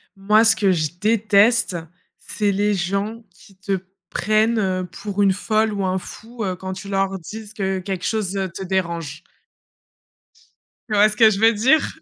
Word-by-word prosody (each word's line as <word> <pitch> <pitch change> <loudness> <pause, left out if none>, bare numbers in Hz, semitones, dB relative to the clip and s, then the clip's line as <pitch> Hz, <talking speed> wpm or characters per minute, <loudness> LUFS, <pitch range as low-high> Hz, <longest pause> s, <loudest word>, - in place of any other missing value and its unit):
Moi, 210 +3 +3
ce 225 0 +5
que 195 -3 +2
je 155 -4 0
déteste, 215 -2 +3 0.4
c'est 205 -2 0
les 205 +1 +1
gens 200 +5 -2
qui 195 - -20
te 195 0 -2 0.3
prennent, 215 +3 +1
heu, 185 -2 -1
pour 200 +3 -5
une 195 -1 +4
folle 215 +2 0
ou 200 -1 -2
un 185 0 0
fou, 225 +4 -8
heu, 185 -2 -2
quand 190 +1 -6
tu 195 +1 -9
leur 195 0 0
dises 210 +5 -9
que 190 -2 -2
quelque 185 -1 -5
chose, 205 -3 -1
heu, 190 -2 -2
te 190 - -7
dérange. 170 -5 -3 1.7
Tu 215 - 0
vois 205 +1 +6
ce 215 - -2
que 220 0 +6
je 200 -2 -2
veux 225 +1 +5
dire? 260 +9 +3
200 Hz, 180 wpm, -21 LUFS, 190-215 Hz, 1.7 s, vois